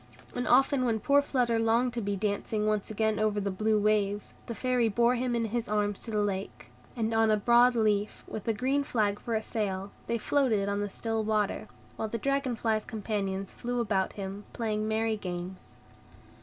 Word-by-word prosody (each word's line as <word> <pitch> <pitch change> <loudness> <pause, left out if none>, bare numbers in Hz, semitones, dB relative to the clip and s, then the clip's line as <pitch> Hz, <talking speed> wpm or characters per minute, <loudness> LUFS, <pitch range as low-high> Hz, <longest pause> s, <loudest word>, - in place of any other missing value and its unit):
And 245 - -2
often 265 +1 +4
when 230 -3 +1
poor 280 +6 +4
Flutter 245 -5 +1
longed 230 +2 +2
to 240 - -2
be 200 -1 -1
dancing 210 +1 -1
once 215 -1 0
again 220 0 0
over 215 -1 +1
the 200 0 -1
blue 215 +3 +1
waves, 205 -1 +1
the 235 - -4
Fairy 250 0 +1
bore 235 +3 +3
him 250 0 0
in 230 -1 0
his 235 +1 -2
arms 205 -1 0
to - - -9
the 210 -1 +1
lake, 195 -1 -4 0.2
and 225 -2 -1
on 225 0 +3
a 215 - +4
broad 240 +3 +5
leaf, 210 -2 +1
with 215 - -6
a - - +4
green 265 +5 +1
flag 210 -7 0
for 230 - -3
a 220 - -1
sail, 200 -3 -3 0.2
they 235 - 0
floated 230 -5 +1
on 200 0 -1
the 205 0 -2
still 225 +2 -2
water; 215 0 0 0.3
while 220 - -2
the 230 - -3
dragon 275 0 0
fly's 220 -1 0
companions 200 -4 -3
flew 245 0 -3
about 200 -5 0
them, 200 +1 -6
playing 215 -2 -1
merry 220 0 0
games. 180 -1 -7
220 Hz, 195 wpm, -29 LUFS, 205-235 Hz, 0.3 s, broad